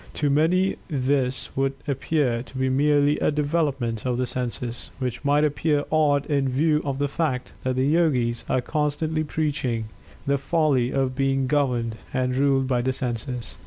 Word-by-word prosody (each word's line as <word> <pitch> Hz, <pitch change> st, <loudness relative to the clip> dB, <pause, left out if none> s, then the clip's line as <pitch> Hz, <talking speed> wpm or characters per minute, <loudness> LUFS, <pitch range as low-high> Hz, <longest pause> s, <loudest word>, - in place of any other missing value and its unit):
To 145 Hz, -2 st, +1 dB
many 175 Hz, +6 st, +2 dB
this 130 Hz, -3 st, -1 dB
would 135 Hz, 0 st, +1 dB
appear 135 Hz, -3 st, 0 dB
to 130 Hz, +1 st, -10 dB
be 130 Hz, 0 st, +1 dB
merely 145 Hz, +2 st, +3 dB
a -, -, +2 dB
development 145 Hz, -6 st, -1 dB
of 125 Hz, -1 st, -1 dB
the 125 Hz, -, 0 dB
Senses, 125 Hz, -1 st, -4 dB
which 125 Hz, -1 st, -4 dB
might 145 Hz, +1 st, +3 dB
appear 150 Hz, 0 st, +1 dB
odd 145 Hz, -2 st, +3 dB
in 140 Hz, -3 st, +1 dB
view 150 Hz, +4 st, +2 dB
of 140 Hz, -2 st, -2 dB
the 145 Hz, +1 st, 0 dB
fact 140 Hz, -4 st, -2 dB
that 130 Hz, 0 st, 0 dB
the 130 Hz, +1 st, +1 dB
Yogis 135 Hz, -7 st, +2 dB
are 130 Hz, -, +2 dB
constantly 155 Hz, +2 st, -1 dB
preaching 135 Hz, -8 st, -2 dB, 0.4 s
the 140 Hz, 0 st, +1 dB
folly 140 Hz, -5 st, +2 dB
of 135 Hz, -2 st, 0 dB
being 135 Hz, 0 st, +1 dB
governed 125 Hz, -5 st, 0 dB, 0.2 s
and 125 Hz, 0 st, 0 dB
ruled 135 Hz, 0 st, +2 dB
by 125 Hz, -2 st, +1 dB
the 130 Hz, +2 st, 0 dB
senses. 120 Hz, -1 st, -4 dB
135 Hz, 165 wpm, -24 LUFS, 125-150 Hz, 0.4 s, merely